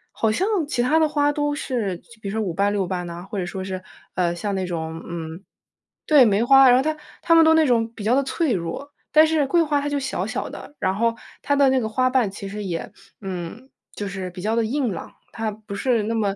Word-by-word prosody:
好 220 -1 +1
像 375 - 0 0.2
其 245 -4 0
他 275 +6 +3
的 315 - +4
花 290 -1 +2
都 290 0 -1
是 230 -10 -2
就 - - -30 0.2
比 200 - -4
如 - - -5
说 220 - -1
5 195 -5 -2
瓣、 200 +3 +1
6 195 -3 0
瓣 180 -1 -3
呐， 170 +2 -8
或 210 - -5
者 180 - -2
说 190 +1 -5
是， 185 -1 -5 0.3
呃， 175 -2 +1
像 200 +3 -3
那 190 -1 -1
种， 160 -1 -5
嗯 165 +1 -6 0.6
对， 295 -4 +7
梅 210 +1 +2
花， 270 +1 +7
然 245 - +6
后 260 - +3
它 310 +1 -1 0.2
它 330 - +4
们 325 - +8
都 320 - +6
那 320 -1 +4
种 230 -3 +1
比 210 - -8
较 225 - +2
的 275 - +3
脆 305 +1 -1
弱， 180 +11 -4 0.2
但 310 +1 +8
是 310 -3 +1
桂 340 +4 +3
花 295 -2 +1
它 290 - -3
就 285 - -1
小 260 -9 -2
小 220 - -3
的， 290 - -10
然 190 - +1
后 230 +2 +1 0.3
它 285 - +1
的 280 -1 +5
那 260 0 +3
个 220 - -2
花 255 +3 +1
瓣 255 -6 +2
其 200 0 -8
实 210 +1 -5
也 170 -3 -4 0.3
嗯， 190 +7 -6 0.3
就 205 - -4
是 190 -2 -5
比 180 - -9
较 215 +4 0
地 225 - +2
硬 255 0 -1
朗。 170 - -7 0.2
它 225 -1 -3
不 210 -1 -10
是 235 0 +1
那 220 +2 -2
么 200 -3 0
220 Hz, 270 characters per minute, -23 LUFS, 190-275 Hz, 0.6 s, 们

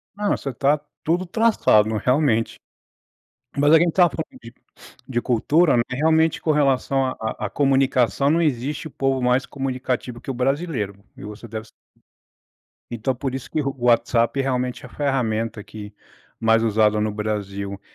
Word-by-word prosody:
Não, 205 0 0
você 140 - -5
está 140 +4 +1 0.2
tudo 175 +4 0
traçado, 185 - +3
não 110 - -1
realmente. 125 -1 +1 1.0
Mas 145 +2 +4
a 160 - +8
quem 170 +2 +3
está 180 +2 +3
falando 135 - -7
de 115 0 -11 0.6
de 120 -2 -1
cultura, 145 +7 +2
né. 120 - +3
Realmente 160 +4 +2
com 155 - +1
relação 135 -2 +2
a 130 - -1
a 110 -1 -4
a - - -10
comunicação, 135 -1 +2
não 165 +3 +3
existe 145 +1 -1
o - - -14
povo 135 -1 0
mais 125 +1 +2
comunicativo 130 -3 -4
que 135 - -5
o - - -4
brasileiro 130 - -1 0.2
e - - -10
você 105 +3 -9
deve 110 0 -6
sa - - -20 1.2
Então, 120 +3 -2
por 130 +1 -4
isso 135 -1 -6
que 155 - -1
o 135 0 -3
WhatsApp 120 +1 +2
realmente 125 -2 -2
é - - -7
a - - -15
ferramenta 115 -6 -1
que, 105 -1 -10 0.5
mais 115 0 +3
usada 105 -1 +2
no 105 0 -1
Brasil. 100 -2 -4
130 Hz, 170 wpm, -22 LUFS, 115-145 Hz, 1.2 s, a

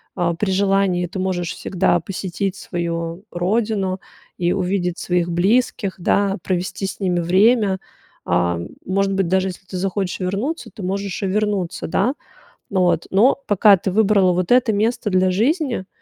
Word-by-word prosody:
а, 175 -2 0
при 190 +3 -1
желании 195 -2 +2
ты 190 +2 -6
можешь 180 -2 -1
всегда 180 -1 +1
посетить 185 +2 -3
свою 170 0 -4
родину 195 +1 -1 0.4
и 175 0 +1
увидеть 180 -2 -1
своих 175 -1 0
близких, 195 +3 +1
да, 200 +3 +1
провести 185 +1 -2
с 190 - -7
ними 180 -2 +1
время. 195 +3 +3 0.5
А, 85 0 +1 0.3
может 195 +1 0
быть, 195 -2 +1
даже 190 +2 +1
если 185 +1 -10
ты 190 - -8
захочешь 190 0 -2
вернуться, 200 - -3
ты 215 - -9
можешь 195 0 -3
и - - +1
вернуться, 200 -3 -1
да. 250 +10 +1 0.6
Ну 190 - +1
вот, 175 - +1
но 215 +8 +4
пока 205 0 +6
ты 190 - -2
выбрала 195 -2 +3
вот 180 +3 0
это 250 -2 +4
место 220 +2 0
для 185 0 +3
жизни, 245 - 0
190 Hz, 155 wpm, -20 LUFS, 180-200 Hz, 0.6 s, пока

